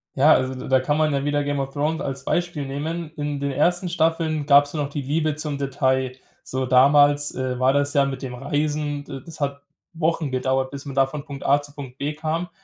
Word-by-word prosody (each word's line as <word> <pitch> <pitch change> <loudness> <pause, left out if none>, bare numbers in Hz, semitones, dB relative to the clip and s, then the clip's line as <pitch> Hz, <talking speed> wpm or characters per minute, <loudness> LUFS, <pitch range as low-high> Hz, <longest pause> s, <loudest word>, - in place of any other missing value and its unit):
Ja, 145 +4 +6
also 130 0 +1
d 130 - -7
da 130 -1 +4
kann 145 +3 0
man 155 -1 +2
ja 140 0 0
wieder 145 0 +1
Game 145 -1 -1
of 135 - -3
Thrones 155 +3 -1
als 135 0 -5
Beispiel 175 -5 -1
nehmen. 155 +4 -4
In 145 -1 -3
den 140 0 -1
ersten 175 +6 +1
Staffeln 160 -2 0
gab's 145 +1 +5
noch 145 -2 -2
die 145 0 -4
Liebe 150 +2 0
zum 150 -2 -4
Detail. 130 -2 0 0.3
So 130 0 -3
damals, 145 +3 +5
äh, 130 -1 -2
war 130 +1 +4
das 145 +1 +1
ja 140 -1 +4
mit 135 -1 -4
dem 130 -2 -5
Reisen 145 +2 -2
d 135 -1 -7
das 160 -2 -11
hat 140 -1 -2 0.3
Wochen 160 -2 0
gedauert, 130 +1 0
bis 140 0 -7
man 140 - -6
da 135 0 +5
von 140 +1 -7
Punkt 140 -3 -8
A 140 +1 +4
zu 145 0 -13
Punkt 135 -3 -9
B 145 +2 -2
kam. 160 +3 -3
145 Hz, 230 wpm, -23 LUFS, 135-150 Hz, 0.3 s, Ja